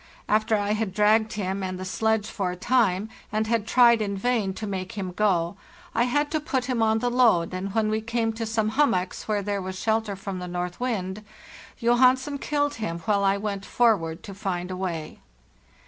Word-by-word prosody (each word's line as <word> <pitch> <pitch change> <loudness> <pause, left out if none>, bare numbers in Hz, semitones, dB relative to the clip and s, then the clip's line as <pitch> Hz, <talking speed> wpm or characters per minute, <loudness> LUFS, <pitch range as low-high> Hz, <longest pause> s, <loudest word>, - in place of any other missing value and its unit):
After 215 +1 +2
I 205 0 0
had 215 -3 -2
dragged 215 +1 +3
him 195 -1 -2
and 185 -1 -4
the 185 - -5
sledge 220 +2 0
for 195 -4 -2
a 180 - -4
time 210 -2 +2 0.2
and 215 +1 0
had 220 -1 0
tried 235 -2 +5
in 200 -2 -2
vain 220 -2 0
to 220 - -5
make 190 -2 -4
him 190 -3 -4
go, 180 -2 +1 0.4
I 235 +1 +2
had 290 +4 0
to 310 - +1
put 280 -5 -1
him 250 -3 -1
on 220 0 +3
the 245 +2 0
load, 225 -10 +3
and 190 +2 -4
when 220 -1 +2
we 220 0 0
came 230 0 -1
to 225 0 -4
some 220 -1 0
hummocks 220 -9 0
where 210 -2 0
there 200 0 -2
was 185 0 -5
shelter 220 -2 0
from 195 -1 -5
the 180 - -5
north 180 0 -4
wind, 210 -5 -2 0.6
Johansen 255 +4 +3
killed 290 0 0
him, 170 -6 -2
while 200 -2 +2
I 195 0 +3
went 200 -1 -3
forward 195 -11 +1
to 200 - -8
find 185 -3 -3
a - - -3
way. 175 -4 -4
215 Hz, 205 wpm, -25 LUFS, 190-230 Hz, 0.6 s, tried